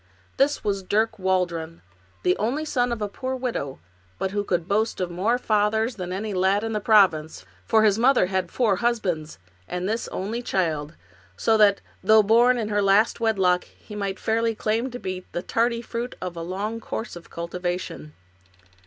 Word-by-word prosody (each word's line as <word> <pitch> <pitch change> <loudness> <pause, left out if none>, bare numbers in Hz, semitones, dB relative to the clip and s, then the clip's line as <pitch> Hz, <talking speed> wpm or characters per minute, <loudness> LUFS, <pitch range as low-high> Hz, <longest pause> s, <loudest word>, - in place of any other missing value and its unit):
This 280 +2 +2
was 200 -2 -1
Dirk 215 +3 0
Waldron, 175 - -1 0.4
the 180 - +3
only 255 +9 -1
son 245 -5 0
of 225 -3 -2
a - - 0
poor 260 +6 -4
widow, 240 - -3 0.4
but 190 - -2
who 205 0 -1
could 175 -4 -1
boast 215 +3 0
of 180 -2 -2
more 205 +8 +1
fathers 220 +1 +1
than 180 -1 -5
any 205 +3 -3
lad 190 +3 +2
in 225 0 -2
the 210 - 0
province, 180 - +3 0.2
for 220 -1 +4
his 210 0 +3
mother 250 -4 +4
had 190 0 -1
had 170 - -21
four 220 -7 +2
husbands, 185 -10 -1 0.3
and 180 +1 -3
this 225 +3 -2
only 215 +6 -3
child, 160 -8 -1 0.4
so 225 - +3
that, 205 -2 +5 0.2
though 215 +2 +6
born 240 +4 +5
in 220 -3 -2
her 205 -1 +1
last 200 +4 +3
wedlock, 190 -6 +2
he 210 - -15
might 200 -1 -3
fairly 225 0 0
claim 225 +4 -1
to 245 - -6
be 185 -5 -5
the 175 - -3
tardy 235 0 0
fruit 235 +2 -5
of 180 -1 -5
a 170 - -5
long 200 +6 -3
course 225 -1 -5
of 175 - -12
cultivation. 175 -2 -4
205 Hz, 185 wpm, -24 LUFS, 180-225 Hz, 0.4 s, though